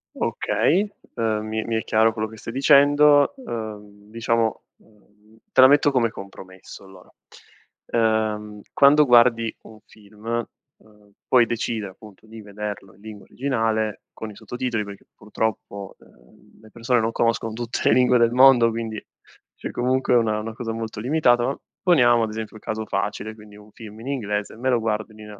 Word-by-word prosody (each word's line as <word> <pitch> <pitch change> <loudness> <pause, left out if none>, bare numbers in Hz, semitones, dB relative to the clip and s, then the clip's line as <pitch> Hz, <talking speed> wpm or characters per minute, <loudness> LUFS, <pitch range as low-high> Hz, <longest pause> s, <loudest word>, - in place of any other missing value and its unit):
Okay, 195 +6 0 0.3
uhm, 110 -2 -1
mi 110 0 -3
mi 115 - -2
è 110 - -1
chiaro 110 +1 +2
quello 110 0 -3
che 110 0 -13
stai 115 - -8
dicendo. 145 - +5
Uhm, 105 - -8
diciamo, 115 0 -1
uhm, 105 0 -26
te - - +5
la 130 - +10
metto 145 +1 +4
come 125 -4 +1
compromesso, 95 -2 -12
allora. 95 0 -16 1.3
Uhm, 105 0 -10
quando 145 +2 +5
guardi 120 -2 +4
un 110 - -15
film, 110 +3 -6 0.3
uhm, 105 -1 -24 0.2
puoi 125 -2 +5
decide, 115 -2 -3
appunto, 100 +2 -15
di 110 0 -12
vederlo 105 -2 -7
in - - -23
lingua 105 -2 -11
originale, 110 -5 -2
con 110 -1 -8
i - - -14
sottotitoli, 120 -1 -4
perché, 100 -1 -11
purtroppo, 105 -2 -5
uhm, - - -23
le 110 - -17
persone 120 +1 0
non 110 +1 -1
conoscono 115 -1 -1
tutte 120 +1 -4
le - - +4
lingue 125 0 +4
del 115 -1 +3
mondo, 125 -2 +6
quindi, 110 -1 -5 0.5
cioè - - -7
comunque 130 +1 0
una 110 -2 +2
una 110 +1 -6
cosa 115 0 -5
molto 110 -2 -6
limitata. 120 -1 +2
Ma, 135 - -1 0.3
poniamo, 120 -10 +4
ad 110 - -2
esempio, 110 0 -7
un 110 - -12
caso 110 0 -4
facile, 110 +1 -3
quindi, 105 -1 -15
un 105 0 -17
film 110 -1 -12
in 115 - -10
inglese, 105 -7 -3
me 130 +3 -1
lo 125 -2 +2
guardo 110 -1 -2
in 110 - -17
nina 105 -1 -11
110 Hz, 175 wpm, -22 LUFS, 105-120 Hz, 1.3 s, la